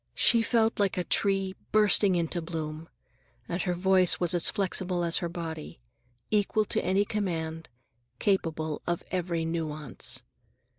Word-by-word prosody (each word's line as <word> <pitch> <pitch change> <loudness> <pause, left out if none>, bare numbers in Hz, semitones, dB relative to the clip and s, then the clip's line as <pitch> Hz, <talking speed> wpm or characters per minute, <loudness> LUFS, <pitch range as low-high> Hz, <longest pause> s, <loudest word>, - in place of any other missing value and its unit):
She 235 -1 +5
felt 225 0 +1
like 200 -2 +1
a 180 - +1
tree 195 +1 +2 0.2
bursting 205 -2 +4
into 170 0 -1
bloom. 160 -1 -5 0.6
And 175 +1 -2
her 180 -2 -1
voice 185 0 +3
was 175 0 +1
as 175 - +3
flexible 185 -3 -1
as 170 -1 +1
her 170 - -3
body; 160 - -6 0.5
equal 210 0 +2
to - - -1
any 195 +3 +2
demand, 165 -7 -3 0.5
capable 160 -5 -1
of 175 -1 -1
every 170 -2 -1
nuance. 155 -3 -2
175 Hz, 140 wpm, -28 LUFS, 165-195 Hz, 0.6 s, She